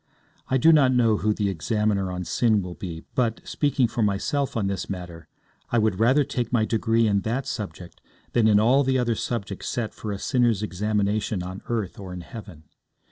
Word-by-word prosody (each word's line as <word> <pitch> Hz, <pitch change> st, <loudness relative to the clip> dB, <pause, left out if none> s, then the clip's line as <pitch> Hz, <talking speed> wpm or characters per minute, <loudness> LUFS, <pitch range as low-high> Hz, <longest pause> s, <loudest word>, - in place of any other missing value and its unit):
I 130 Hz, -, +2 dB
do 160 Hz, +5 st, +6 dB
not 140 Hz, -4 st, +5 dB
know 115 Hz, -4 st, +3 dB
who 105 Hz, +1 st, +1 dB
the 105 Hz, -1 st, 0 dB
examiner 100 Hz, +1 st, 0 dB
on 90 Hz, 0 st, -4 dB
sin 110 Hz, -2 st, +2 dB
will 90 Hz, -1 st, -6 dB
be, 85 Hz, -3 st, -7 dB
but, 115 Hz, -3 st, 0 dB
speaking 145 Hz, -4 st, +1 dB
for 115 Hz, -, -3 dB
myself 115 Hz, +7 st, 0 dB
on 105 Hz, -, 0 dB
this 95 Hz, -2 st, -3 dB
matter, 85 Hz, -4 st, -7 dB, 0.4 s
I 120 Hz, -, +1 dB
would 110 Hz, -4 st, +1 dB
rather 130 Hz, +6 st, +4 dB
take 125 Hz, -4 st, -3 dB
my 115 Hz, -3 st, +2 dB
degree 115 Hz, +1 st, +1 dB
in 100 Hz, -2 st, +2 dB
that 120 Hz, +7 st, -2 dB
subject 105 Hz, -9 st, -6 dB, 0.3 s
than 115 Hz, -2 st, +4 dB
in 105 Hz, -1 st, +5 dB
all 125 Hz, +6 st, +4 dB
the 130 Hz, 0 st, +1 dB
other 120 Hz, -2 st, +1 dB
subjects 100 Hz, -4 st, -4 dB
set 115 Hz, -3 st, -3 dB
for 105 Hz, -, -6 dB
a 100 Hz, -, -3 dB
sinner's 120 Hz, -2 st, +1 dB
examination 105 Hz, 0 st, -1 dB
on 95 Hz, +2 st, -7 dB
earth 110 Hz, -5 st, -3 dB
or 95 Hz, -2 st, -7 dB
in 90 Hz, -, -6 dB
heaven. 95 Hz, -5 st, -10 dB
110 Hz, 195 wpm, -25 LUFS, 100-120 Hz, 0.4 s, do